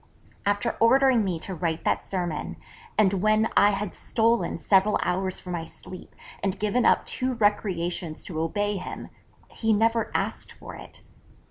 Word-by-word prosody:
_After 205 +3 0
ordering 260 0 +5
me 185 -4 -1
to 190 - -4
write 165 -2 -2
that - - 0
sermon, 175 -5 -3 0.4
and 205 -2 +4
when 215 +3 +2
I 205 - +6
had 200 -1 -2
stolen 230 +1 +1
several 200 +1 +3
hours 185 +1 -1
from 180 - -6
my 170 -1 -3
sleep, 180 +2 -11 0.3
and 195 0 -1
given 215 +4 +1
up - - +3
two 255 0 -1
recreations 180 -6 -1
to 160 -4 -5
obey 205 +5 -1
him, 180 - -7 0.4
he 220 -1 +1
never 225 +2 +2
asked - - -2
for - - -11
it! - - -12
205 Hz, 155 wpm, -26 LUFS, 180-220 Hz, 0.4 s, I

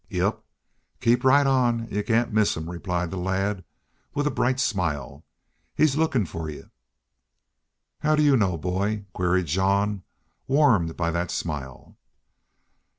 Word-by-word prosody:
"Yep. - - -1 0.6
Keep 120 +1 +2
right 140 +2 +5
on, 125 -3 +2
an' 115 - -8
y'u 105 - 0
cain't 115 +1 0
miss 110 -4 +2
him," 80 0 -5
replied 90 -1 -3
the 95 - -4
lad, 95 +1 -1 0.5
with 145 - 0
a 150 - +1
bright 130 +1 0
smile. 80 - -2 0.5
"He's 155 -3 +3
lookin' 150 -9 +1
fer 80 -1 -6
y'u." 75 - -10 1.3
"How 155 0 +2
do 150 - +3
you 145 -2 +5
know, 95 -8 +1
boy?" 100 +5 -2
queried 90 0 +1
Jean, 100 +4 +1 0.5
warmed 125 - +3
by 85 -1 0
that 85 +1 -2
smile. 70 -6 -6
100 Hz, 145 wpm, -25 LUFS, 85-125 Hz, 1.3 s, right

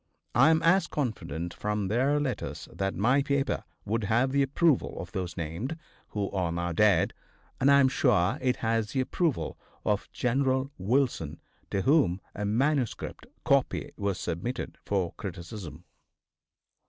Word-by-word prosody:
I 135 +6 +6
am 160 0 +3
as 185 +3 +4
confident, 85 - -3
from 105 +1 -2
their 130 +8 +2
letters, 140 -4 -3
that 95 0 -2
my 125 +7 +3
paper 140 0 0 0.2
would 110 +1 -1
have 120 +5 +2
the 140 +1 +3
approval 145 +2 +2
of - - -7
those 90 -2 -4
named, 85 - -3 0.3
who 100 -2 -3
are 90 -4 0
now 85 +1 -2
dead, 100 -1 +3 0.5
as 135 - +4
I 140 0 +7
am 135 - +6
sure 110 -8 +2
it 130 -1 +2
has 115 -1 0
the 135 - 0
approval 155 +2 -1 0.3
of 105 -1 0
General 130 +2 +1
Wilson, 100 - 0 0.3
to 95 -1 -1
whom 135 - +3
a 105 - -3
manuscript 130 +4 0 0.2
copy - - +2
was 100 -3 -2
submitted 90 +10 -4
for 95 -4 0
criticism. 85 -3 -7
115 Hz, 145 wpm, -28 LUFS, 95-135 Hz, 0.5 s, I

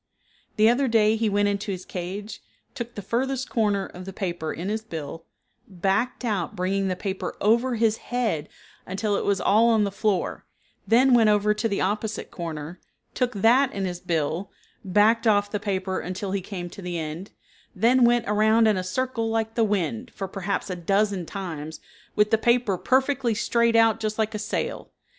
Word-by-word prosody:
The 215 +1 +5
other 255 +4 +3
day 220 -2 +4
he 225 -1 0
went 205 0 +2
into 205 +1 -2
his 185 -1 -6
cage, 195 +4 -6 0.3
took 235 -1 -6
the 205 - -6
furthest 265 +5 -2
corner 205 -4 +1
of 180 +1 -10
the 195 - -6
paper 175 -5 -3
in 175 +4 -5
his 220 +1 -1
bill, 165 -5 -7 0.4
backed 195 +7 -1
out 210 -3 -2
bringing 195 +1 0
the 185 - -1
paper 190 +1 -4
over 235 +4 +2
his 225 -1 +2
head 220 -12 -2 0.4
until 200 +2 -1
it - - -1
was 200 -1 +1
all 220 +5 +4
on 220 -2 +3
the 200 - -1
floor, 200 -2 -1 0.4
then 250 +5 +5
went 225 -3 +5
over 210 0 +3
to 225 +2 -1
the 200 - -1
opposite 210 +3 -2
corner, 165 0 -6 0.3
took 250 -1 0
that 240 +7 +4
in 195 -1 -2
his 175 -1 -4
bill, 170 +1 -2 0.3
backed 215 +5 +3
off 205 -1 +3
the 210 - -1
paper 190 -2 -2
until 185 +2 -4
he 195 0 -1
came 180 -2 -6
to - - -10
the 180 -1 -4
end, 160 +4 -5 0.5
then 240 +6 +4
went 240 0 +4
around 220 +2 +4
in 215 -3 +3
a 185 - -2
circle 230 +4 -2
like 225 0 -1
the 230 - +2
wind, 215 +4 -1
for 195 - -4
perhaps 195 +1 -3
a - - -2
dozen 195 0 0
times, 160 -6 -6 0.4
with 210 0 +3
the 225 - +4
paper 235 -4 +2
perfectly 260 +2 +1
straight 235 +1 +2
out 225 -1 +4
just 215 -1 -2
like 220 0 0
a 210 - -3
sail. 210 - -3
210 Hz, 190 wpm, -25 LUFS, 185-225 Hz, 0.5 s, The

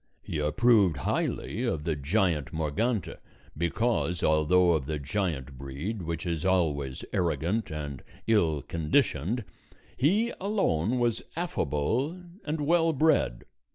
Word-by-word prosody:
He 80 - -3
approved 100 - +3
highly 90 - -2
of 100 -12 -1
the 80 -1 0
giant 80 0 0
Morgante, 90 +8 -1 0.4
because 85 +2 0
although 80 +4 +4
of 75 -5 0
the 80 -1 -2
giant 70 -4 -3
breed, 70 +11 -4
which 85 0 -4
is 85 -2 -2
always 75 -8 0
arrogant 90 +4 0
and 75 -4 -5 0.2
ill 80 - +2
conditioned, 85 - 0 0.5
he 205 - +2
alone 130 - +1
was 120 -2 +1
affable 130 - -1 0.3
and 155 0 -2
well 165 +2 +3
bred. 130 - +2
85 Hz, 120 wpm, -28 LUFS, 75-115 Hz, 0.5 s, although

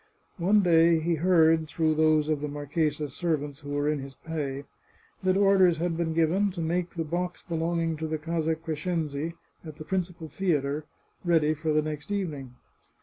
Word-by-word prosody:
One 200 +5 +4
day 165 -1 +5
he 170 +2 0
heard, 160 -1 +4
through 160 0 +1
those 155 -1 +3
of 155 -2 0
the 150 - -2
marchesa's 145 0 -2
serv 160 -5 0
ants 145 -1 -8
who 145 - -10
were 145 0 0
in 150 -1 +1
his 135 0 -9
pay, 145 -4 -4 0.6
that 185 0 +2
orders 195 -4 +5
had 170 +1 -1
been 165 -1 -1
given 170 +5 +2
to 175 - -7
make 170 +2 -1
the 165 - -1
box 175 +3 -3
belonging 165 -1 -1
to 160 +1 -3
the 155 0 -2
Casa 160 0 -1
Crescenzi, 160 -1 -3 0.3
at 155 -3 -9
the 155 - -10
prin 190 +3 +1
cipal 170 -3 -10
theatre, 150 -5 -1 0.4
ready 160 -3 +3
for 155 +1 -2
the 155 0 +2
next 150 +1 -5
evening. 150 -11 -3
160 Hz, 185 wpm, -27 LUFS, 150-170 Hz, 0.6 s, day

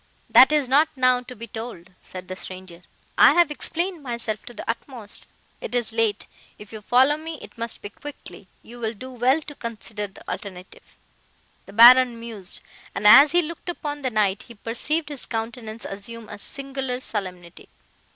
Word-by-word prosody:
"'That 260 +3 +8
is 300 -3 +2
not 290 +5 +4
now 255 -1 +3
to 250 0 -11
be 230 +1 -8
told,' 220 -6 -8
said 185 -1 -9
the 185 - -5
stranger, 185 -2 -9 0.4
'I - - +8
have 345 -3 +4
explained 340 +3 -2
myself 235 -5 -4
to - - -10
the 235 - -9
utmost. 230 -2 -5 0.3
It - - -5
is 240 -2 -1
late; 225 -2 0 0.3
if 210 +1 -13
you 215 - -7
follow 260 +7 +4
me 320 0 -6
it - - -13
must 230 -1 -4
be 205 - -7
quickly;—you 240 -4 -12
will 225 -1 -2
do 255 +5 -9
well 255 +5 +2
to 295 - -9
consider 220 -4 -6
the 195 - -17
alternative.' 185 -2 -8 0.7
"The - - -12
Baron 240 +1 +8
mused, 220 -5 -6 0.3
and, - - -4
as 280 +8 +9
he 350 0 +4
looked 335 +2 -7
upon 295 -4 -4
the 260 - -1
knight, 210 -3 +1
he 235 - -12
perceived 295 +9 -3
his 285 -3 -8
countenance 225 -1 -5
assume 215 +3 -8
a - - -8
singular 270 0 -5
solemnity." 185 -7 -6
235 Hz, 175 wpm, -24 LUFS, 210-270 Hz, 0.7 s, as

